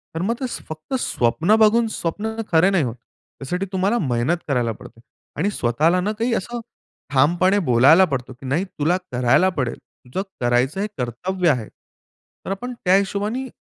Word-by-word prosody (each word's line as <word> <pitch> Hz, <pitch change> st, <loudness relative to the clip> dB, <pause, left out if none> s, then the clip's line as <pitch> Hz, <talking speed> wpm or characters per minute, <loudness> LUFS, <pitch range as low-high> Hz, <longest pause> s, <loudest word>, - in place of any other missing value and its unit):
तर 165 Hz, -, -2 dB
मग 220 Hz, +5 st, +1 dB
ते 265 Hz, -, -2 dB, 0.2 s
फक्त 155 Hz, -, -8 dB
स्वप्न 125 Hz, -, +2 dB
बघून, 225 Hz, +2 st, +4 dB
स्वप्न 215 Hz, +3 st, -3 dB, 0.2 s
खरे 170 Hz, +3 st, +5 dB
नाही 185 Hz, -6 st, +2 dB
होत; 120 Hz, -1 st, -3 dB
त्यासाठी 180 Hz, +8 st, -6 dB
तुम्हाला 195 Hz, +5 st, +1 dB
मेहनत 130 Hz, -, 0 dB
करायला 120 Hz, -5 st, +1 dB
पडते 115 Hz, -, -13 dB, 0.4 s
आणि 190 Hz, +7 st, +1 dB
स्वतःला 155 Hz, -, +1 dB
ना 205 Hz, +4 st, -1 dB
काही 230 Hz, +1 st, +1 dB
असं 240 Hz, +5 st, -4 dB, 0.5 s
ठामपणे 175 Hz, +9 st, +3 dB
बोलायला 140 Hz, +10 st, +6 dB
पडतो, 130 Hz, -4 st, -4 dB
की 130 Hz, +2 st, -14 dB
नाही 155 Hz, +8 st, 0 dB
"तुला 175 Hz, -1 st, 0 dB
करायला 125 Hz, +9 st, +3 dB
पडेल, 125 Hz, -4 st, -1 dB, 0.3 s
तुझं 130 Hz, +10 st, -3 dB, 0.2 s
करायचं 125 Hz, +9 st, +1 dB
हे 210 Hz, -, -1 dB
कर्तव्य 170 Hz, +9 st, -1 dB
आहे." 120 Hz, -7 st, 0 dB, 0.8 s
तर -, -, -3 dB
आपण 245 Hz, +6 st, -4 dB
त्या 185 Hz, +1 st, +5 dB
हिशोबाने 205 Hz, +6 st, -1 dB
175 Hz, 165 wpm, -21 LUFS, 130-200 Hz, 0.8 s, बोलायला